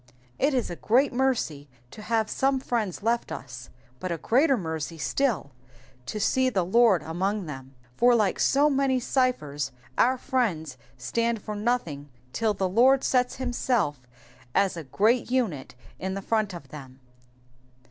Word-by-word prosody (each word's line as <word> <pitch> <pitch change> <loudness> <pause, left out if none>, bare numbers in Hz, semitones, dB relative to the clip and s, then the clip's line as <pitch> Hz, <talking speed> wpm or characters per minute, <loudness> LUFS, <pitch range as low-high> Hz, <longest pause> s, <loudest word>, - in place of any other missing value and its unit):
It 280 0 +2
is 245 -7 -1
a - - -4
great 255 - +2
mercy 235 - -1 0.2
to 215 - -10
have 220 0 0
some 270 +2 +1
friends 220 -8 -2
left 235 +1 0
us, 125 -1 -8 0.3
^ut 185 - -4
a 170 - -2
greater 265 - +3
mercy 160 -3 -4
still 200 - -1 0.6
to 215 - -4
see 260 +5 +2
the 190 -7 0
Lord 215 -1 +4
among 190 +5 -2
them, 135 -3 -9 0.2
for 245 0 +5
like 210 -5 +1
so 285 +2 +4
many 270 -2 +2
cyphers 155 - -1 0.3
our 255 +2 +4
friends 205 - -1 0.2
stand 230 - -1
for 210 - -5
nothing 205 - -2 0.2
till 220 -2 0
the 190 -1 0
Lord 250 +8 +4
sets 250 -1 +1
himself 245 - -1 0.5
as 195 -2 +2
a 165 - -6
great 220 - +1
unit 210 - -1 0.2
in 190 +1 -3
the 195 - -5
front 215 -4 0
of 140 -5 -11
them. 130 -3 -11
215 Hz, 155 wpm, -26 LUFS, 160-250 Hz, 0.6 s, for